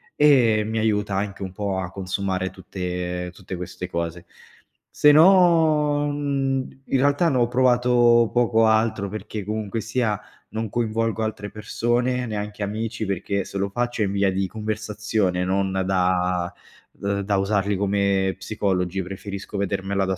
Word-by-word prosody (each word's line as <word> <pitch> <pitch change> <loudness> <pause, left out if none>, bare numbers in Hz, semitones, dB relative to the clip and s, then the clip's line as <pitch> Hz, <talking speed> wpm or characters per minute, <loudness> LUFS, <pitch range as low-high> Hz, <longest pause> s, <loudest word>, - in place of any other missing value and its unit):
e 120 -8 +5
mi 110 +1 -3
aiuta 105 -2 0
anche 100 0 -3
un 95 -1 -6
po' 100 -1 -2
a 90 -1 -4
consumare 95 0 -2
tutte 90 -1 -5
tutte 95 0 -8
queste 90 0 -6
cose. 85 +1 -4 0.6
Se 150 - +5
no, 160 -4 +5
mhmm, 135 -2 -2
in 135 - +1
realtà 145 +5 +3
ne 130 - +1
ho 120 -1 +3
provato 120 -2 +4
poco 115 -2 +3
altro, 110 -2 +2
perché 105 0 -6
comunque 110 0 -3
sia 115 -2 -1 0.3
non 110 -1 -4
coinvolgo 115 -1 -1
altre 105 -1 -4
persone, 120 +4 -1
neanche 105 -1 -4
amici, 110 +1 -3
perché 100 +1 -2
se 100 - -6
lo 100 +1 -1
faccio 120 +1 -2
è - - +3
in 95 - -2
via 100 -1 +2
di 95 +1 0
conversazione 105 -3 -2
non 95 +1 0
da 90 -2 0 0.4
d 100 0 -2
da 100 0 +1
usarli 100 0 +1
come 100 -1 +1
psicologi, 95 -2 -1
preferisco 100 +2 -7
vedermela 100 0 -1
da 95 0 -1
105 Hz, 150 wpm, -23 LUFS, 95-120 Hz, 0.6 s, e